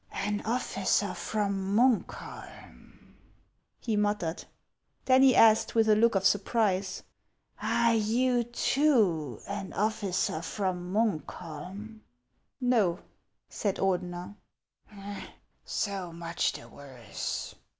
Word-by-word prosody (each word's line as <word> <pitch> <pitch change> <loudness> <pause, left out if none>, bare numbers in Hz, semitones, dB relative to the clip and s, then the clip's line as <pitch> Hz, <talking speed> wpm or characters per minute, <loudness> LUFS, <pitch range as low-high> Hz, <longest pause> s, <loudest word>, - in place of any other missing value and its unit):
"An 205 +1 -2
officer 205 -4 0
from 200 0 -2
Munkholm 245 -2 -2 0.2
?" - - -31
he 225 -3 +1
muttered. 205 -4 -1 0.6
Then 260 0 +5
he 265 -2 +6
asked, 220 0 +5
with 225 -1 +4
a 215 - +6
look 230 0 +3
of 195 0 +1
surprise, 200 -2 +1 0.6
"Are 235 0 +2
you 240 +3 +2
too 220 - +1
an 200 -1 -5
officer 200 -6 -1
from 180 -1 -3
Munkholm? 200 +1 -3 0.3
" 125 - -46
"No," 225 -9 +2 0.5
said 200 -3 -2
Ordener. 180 0 -2 0.7
" 205 -1 -6 0.4
So 195 -4 -2
much 170 0 -2
the - - -10
worse 125 -7 -6
205 Hz, 105 wpm, -29 LUFS, 180-225 Hz, 0.7 s, he